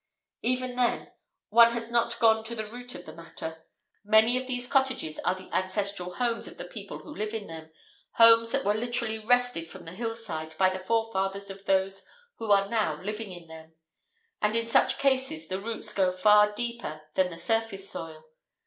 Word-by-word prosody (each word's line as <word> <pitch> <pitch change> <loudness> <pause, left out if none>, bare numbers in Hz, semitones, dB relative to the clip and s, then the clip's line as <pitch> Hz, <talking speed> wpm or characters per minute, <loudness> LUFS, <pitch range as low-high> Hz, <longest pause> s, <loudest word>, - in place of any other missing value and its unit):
Even 255 0 -1
then, 245 -1 0 0.4
one 235 +2 +7
has 235 0 -5
not 235 0 +1
gone 220 -1 +4
to 235 +1 -4
the 220 -1 -4
root 245 +4 -8
of - - -9
the - - -10
matter. 160 -1 -9 0.4
Many 220 +3 +5
of 255 0 -2
these 250 -1 -2
cottages 265 - +1
are 180 - 0
the 185 0 -11
ancestral 185 -1 -1
homes 240 -2 0
of - - -11
the - - -7
people - - -8
who 300 - -10
live 215 +1 -3
in 215 -2 -4
them, 160 -2 -9 0.4
homes 230 0 +7
that 275 +3 -1
were 205 - +3
literally 230 0 -1
wrested 245 -7 +1
from - - -11
the 165 - -8
hillside 185 -7 -5
by 190 -1 +4
the 185 - -4
forefathers 200 -2 -1
of 195 0 -12
those 195 0 +1 0.4
who 225 - -5
are 200 -1 +4
now 200 -9 0
living 210 0 -5
in 175 -2 -11
them. 160 0 -13 0.7
And 210 +1 +1
in 230 0 0
such 230 - +3
cases 260 - 0
the 190 +1 -3
roots 220 -1 -4
go 190 -2 +2
far 210 +3 +5
deeper 235 -9 -4
than 185 -1 +2
the 165 - -9
surface 200 +1 -1
soil. 160 -1 -6
210 Hz, 190 wpm, -28 LUFS, 185-235 Hz, 0.7 s, one